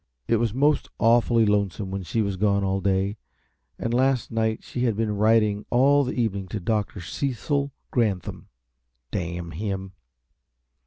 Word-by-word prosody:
It 115 - +3
was 115 -1 0
most 145 +6 +2
awfully 115 0 +4
lonesome 100 -1 0
when 95 0 -3
she 110 +5 -1
was 100 -2 -2
gone 100 +1 +1
all 95 0 0
day, 95 +2 0 0.6
and 115 - -2
last 130 0 +1
night 110 -1 0
she 125 0 -2
had 115 -3 +1
been 110 -1 -1
writing 105 -1 +3
all 140 +4 +4
the 125 - -3
evening 100 -5 -1
to 105 +4 -4
Dr. 105 +1 -1
Cecil 140 - -2 0.2
Granthum 105 -8 -1 0.6
damn 85 -2 -4
him! 95 +2 -4
105 Hz, 150 wpm, -25 LUFS, 95-120 Hz, 0.6 s, awfully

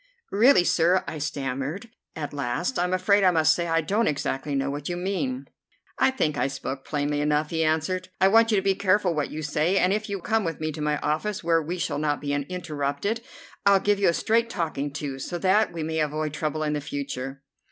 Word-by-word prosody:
"Really, 225 0 +5
sir," 175 +2 +3
I 155 - -5
stammered 140 - -4 0.2
at 145 -2 -5
last, 145 - -2
"I'm 180 +1 0
afraid 195 +2 +3
I 185 - +6
must 160 -2 +4
say 170 +1 -2
I 165 0 +2
don't 205 +8 +1
exactly 140 0 -2
know 135 0 0
what 145 +2 -5
you 175 - -2
mean." 200 +9 -2 0.5
"I - - +5
think 155 - -1
I - - +2
spoke 135 0 -5
plainly 145 0 -1
enough," 150 +1 +1
he 160 -1 +1
answered. 160 +4 0
"I 190 - +5
want 225 +3 +5
you 220 - +3
to 190 - +1
be 195 - +3
careful 190 -1 +2
what 150 -2 -1
you 155 +1 -5
say, 155 +5 +1
and 185 0 +3
if 215 +1 -2
you 200 -1 -3
come 220 +4 0
with 165 -3 -3
me 155 0 -2
to 150 - -7
my 150 0 +1
office, 205 +8 -1
where 165 -1 +3
we 170 +4 -4
shall 170 - -2
not 150 -1 0
be 145 -1 -3
interrupted, 150 +5 -2 0.4
I'll 200 -1 +5
give 205 +1 +1
you 200 - +4
a - - +2
straight 230 +5 +1
talking 155 -7 -2
to, 140 -2 -5
so 175 +6 -4
that 195 +4 +3
we 165 -2 -4
may 160 0 -2
avoid 155 0 -1
trouble 155 0 -2
in 150 -1 0
the 150 - -2
future." 140 -1 -5
160 Hz, 225 wpm, -25 LUFS, 145-195 Hz, 0.5 s, I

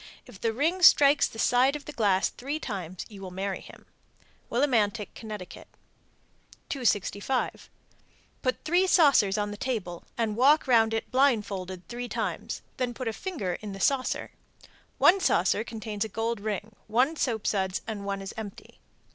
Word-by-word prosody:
If 190 - -14
the 225 - +1
ring 320 +10 0
strikes 285 -4 +7
the - - -12
side 250 +5 +3
of 295 - -7
the - - -6
glass 200 -7 +2
three 280 +4 -4
times 185 - -5
you 200 -3 -12
will 190 - -6
marry 190 +1 -3
him. - - -14 0.6
Willimantic, 230 -5 +1
Conn. 220 - -10
265. 210 +3 -4 0.7
Put 255 -2 -1
three 355 +4 +3
saucers 275 - +5
on 205 0 -1
the 205 - -7
table, 205 -9 -3
and 225 -3 0
walk 280 +6 +5
round 225 -3 +4
it 225 - -4
blindfolded 200 -9 0
three 245 0 -5
times, 215 -1 -3
then 245 -2 -2
put 255 -2 -3
a - - -4
finger 220 - -4
in 205 -2 -6
a - - -9
saucer. 260 +5 0 0.7
One 385 +3 +6
saucer 190 - +2
contains 215 -2 -4
a 220 - -5
gold 225 +2 -2
ring, 210 +1 -4
one 250 +8 +2
soapsuds, 205 -8 -1
one 200 -2 -4
is 195 - -7
empty. 215 -4 -9
225 Hz, 155 wpm, -27 LUFS, 200-255 Hz, 0.7 s, strikes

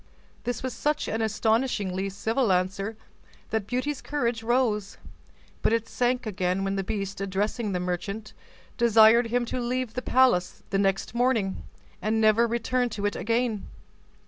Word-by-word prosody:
This 245 +1 -2
was 260 -2 -2
such 300 +6 -1
an 225 - -1
astonishingly 215 -3 0
civil 220 +4 0
answer 195 +4 0 0.5
that 220 -3 -1
Beauty's 255 +4 -2
courage 240 -6 -1
rose: 225 -4 0 0.6
but - - +2
it 230 0 0
sank 250 0 0
again 185 -2 -1
when 195 0 -1
the 195 - -1
beast, 195 -1 -4
addressing 205 +3 -1
the 180 - -1
merchant, 185 +4 -4 0.5
desired 230 0 +6
him 240 +1 0
to 250 - -3
leave 250 -1 -2
the 250 - -3
palace 250 -10 +2
next 195 +1 +1
morning, 235 -6 0 0.4
and 220 +1 +1
never 220 +2 +4
return 240 +2 0
to 205 -2 -4
it 205 - 0
again. 230 -1 -1
220 Hz, 145 wpm, -26 LUFS, 195-245 Hz, 0.6 s, desired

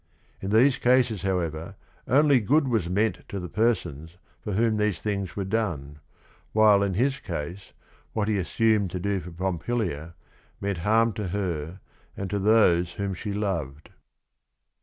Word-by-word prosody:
In 95 - -3
these 125 +6 +4
cases, 120 -4 +3
however, 85 -4 -2 0.3
only 140 +1 +5
good 140 +7 +2
was 110 -9 0
meant 100 +1 +1
to 100 - -4
the 90 - -5
persons 90 - -1 0.3
for 105 - -3
whom 110 +2 +2
these 105 -4 0
things 100 -4 -3
were 100 - -2
done, 85 -9 -2 0.5
while 105 -2 +5
in 100 -2 0
his 135 +6 +1
case 85 +2 -6 0.4
what 105 -2 0
he 105 -2 +1
as 90 - -3
sumed 110 -4 +2
to 90 - -4
do 100 +1 -1
for 90 0 -9
Pompilia 85 -2 -3 0.4
meant 100 -3 -2
harm 110 +5 +3
to 105 -1 -4
her 90 -2 -3 0.4
and 100 -1 -4
to 100 - 0
those 95 -5 +4
whom 100 -1 -3
she 100 +3 -5
loved. 85 -9 -3
100 Hz, 160 wpm, -26 LUFS, 85-110 Hz, 0.5 s, only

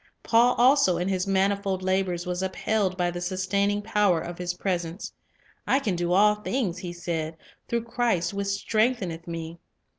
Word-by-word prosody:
Paul 240 +2 +4
also 250 -7 +4
in 180 +2 -1
his 190 0 -1
manifold 195 -1 +1
labors 185 -2 0
was 180 0 -2
upheld 190 0 -1
by 175 -1 +1
the 175 0 -5
sustaining 200 +3 0
power 205 -5 +2
of 175 +1 -7
His 180 0 -2
presence. 175 -1 -3 0.5
"I 265 - +4
can 220 -10 -1
do 175 0 -1
all 210 +3 +5
things," 210 -3 -2
he 180 -1 -5
said, 165 -2 -4 0.3
"through 235 -1 -1
Christ 230 -7 0
which 200 0 -2
strengtheneth 200 -4 0
me." 165 0 -6
190 Hz, 160 wpm, -26 LUFS, 175-210 Hz, 0.5 s, all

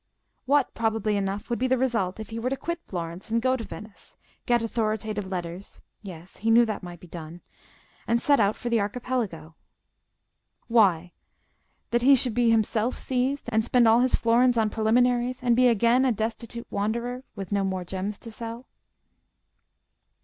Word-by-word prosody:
What, 285 -1 +2
probably 220 -2 0
enough, 200 +1 -2
would 235 - 0
be 260 - +1
the 260 0 +2
result 225 -7 -1
if 220 0 -8
he 225 - -4
were 245 +2 -1
to 270 - -2
quit 340 +4 -4
Florence 170 +1 -6
and 230 +1 +1
go 255 +2 +2
to 240 - -5
Venice; 215 -1 -11 0.3
get 240 -1 +3
authoritative 215 -3 -2
letters—yes, 180 0 -8
he 225 - -1
knew 235 +1 +6
that 215 -2 -4
might 175 -2 -9
be - - -13
done—and 175 +7 -7
set 285 +2 +3
out 205 0 +3
for 240 - -5
the 230 - +3
Archipelago? 205 -7 -3 1.1
Why, 185 -7 +3 0.8
that 240 0 +2
he 275 +3 +7
should 250 -2 0
be 240 0 +3
himself 225 +1 +1
seized, 260 +2 -1
and 220 0 +2
spend 245 0 +3
all 225 +1 +6
his 255 0 +3
florins 240 +1 +3
on 220 -2 +2
preliminaries, 245 +3 +1
and 240 -1 +3
be 255 +1 +5
again 235 +2 +3
a 260 - +3
destitute 230 +2 -4
wanderer—with 230 -1 -4
no 200 -1 +1
more 190 -2 -2
gems 190 +3 -4
to 230 - -9
sell. 230 +2 -7
225 Hz, 165 wpm, -26 LUFS, 200-245 Hz, 1.1 s, he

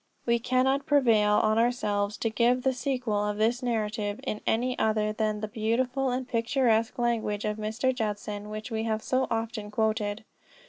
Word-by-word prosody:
We 235 0 +2
cannot 260 +3 +1
prevail 230 -8 +4
on 215 +1 +3
ourselves 210 -4 0
to 225 - -1
give 245 +2 +2
the 265 -1 +2
sequel 250 -5 -1
of 210 0 -2
this 230 +4 +1
narrative 215 -3 -2
in 210 - -3
any 250 +3 +1
other 215 -1 +1
than 215 -1 -1
the 215 - -2
beautiful 245 +5 0
and 250 0 -2
picturesque 230 -1 +1
language 230 -4 -1
of 210 0 -1
Mr. 220 +5 -1
Judson 210 -3 -4
which 215 +3 -6
we 220 0 -1
have 220 -1 -1
so 260 0 +1
often 225 -2 -3
quoted. 215 0 -1
225 Hz, 170 wpm, -28 LUFS, 215-250 Hz, -, prevail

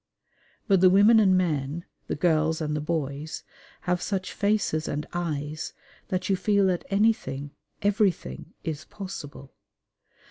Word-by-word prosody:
But 195 -3 +4
the 185 - +8
women 205 +4 +7
and 190 -3 +5
men, 160 -2 -1 0.2
the - - -1
girls 160 0 +2
and 150 -2 -1
the 150 - -1
boys, 150 -1 -3 0.4
have 180 -1 0
such 190 -2 -2
faces 200 -6 +1
and 150 +1 -2
eyes 155 -3 -3 0.3
that 185 -1 -2
you 195 - +3
feel 200 +1 +2
that 175 - -5
anything, 195 -10 +1 0.3
everything, 200 - 0
is 155 -3 -4
possible. 150 -8 -8
170 Hz, 135 wpm, -26 LUFS, 150-195 Hz, 0.4 s, the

